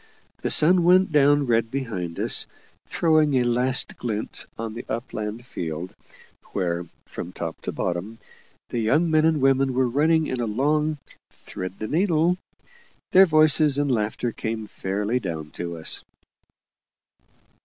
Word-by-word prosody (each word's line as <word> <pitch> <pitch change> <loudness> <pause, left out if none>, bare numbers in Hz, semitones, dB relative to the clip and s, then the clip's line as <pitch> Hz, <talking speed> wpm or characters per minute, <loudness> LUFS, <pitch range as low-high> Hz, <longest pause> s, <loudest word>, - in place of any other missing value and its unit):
The - - -1
sun 175 +3 +5
went 185 +1 +4
down 145 -1 +4
red 115 -2 +1
behind 105 -11 -4
us, - - +3 0.4
throwing 155 -4 +2
a 130 - +3
last 125 +2 +1
glint 110 -3 -5
on 115 -1 -5
the 120 +2 -7
upland 110 0 -5
field, 85 -4 -5 0.6
where, 85 -3 -2 0.2
from 85 - -7
top 85 -2 -6
to - - -4
bottom, 90 +6 -3 0.5
the 120 - -2
young 150 +10 +2
men 155 0 +4
and 160 -2 +2
women 135 -1 +2
were 130 0 +2
running 155 +5 +2
in 130 -4 -3
a 115 - -1
long 150 +7 0 0.3
"Thread 95 +1 -8
the 110 - -5
needle." 175 - +1 0.7
Their 190 +1 +7
voices 155 -2 +5
and 145 -1 +1
laughter 115 +1 -1
came 110 -1 -4
fairly 105 +4 -2
down 80 -7 -6
to 85 -1 -6
us. 80 - -2
125 Hz, 145 wpm, -24 LUFS, 105-150 Hz, 0.7 s, Their